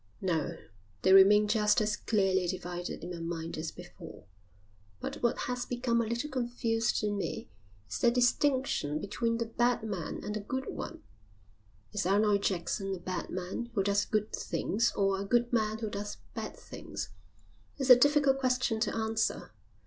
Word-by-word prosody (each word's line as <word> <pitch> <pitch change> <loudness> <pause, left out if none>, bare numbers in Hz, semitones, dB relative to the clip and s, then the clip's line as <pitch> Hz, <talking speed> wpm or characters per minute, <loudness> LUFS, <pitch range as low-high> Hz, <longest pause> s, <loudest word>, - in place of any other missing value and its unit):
"No, 165 -5 -1 0.5
they 190 - +6
remain 205 +2 +7
just 210 -1 +3
as 210 -1 +1
clearly 190 -4 +1
divided 175 -2 -4
in 175 - -5
my 175 - -6
mind 165 0 -4
as 160 +1 -3
before, - - -11 0.8
but - - -5
what 235 - +2
has 250 0 -2
become 245 -1 0
a 225 - -2
little 235 +5 -2
confused 240 -4 -1
in 205 -1 0
me - - -4 0.4
is 95 - -4
the 240 - +5
distinction 250 - +1
between 230 +5 -1
the 230 - -1
bad 240 +1 +1
man 195 -7 -4
and 210 - -3
the 215 - -2
good 260 +6 -4
one. 330 -1 -6 0.9
Is 205 -3 -1
Arnold 205 +1 +3
Jackson 195 +1 -1
a - - -9
bad 180 +1 -4
man 185 +6 -4
who 195 - +2
does 200 +1 +2
good 215 0 -1
things 235 +4 0
or 195 -1 +1
a - - -2
good 240 +4 +1
man 220 -2 +1
who 220 -1 -3
does 205 +1 -5 0.2
bad - - -5
things? - - -7 0.7
It's 270 -2 +3
a - - +13
difficult 280 +1 +4
question 255 -3 +1
to 220 - 0
answer. 225 0 -1
215 Hz, 170 wpm, -31 LUFS, 195-240 Hz, 0.9 s, a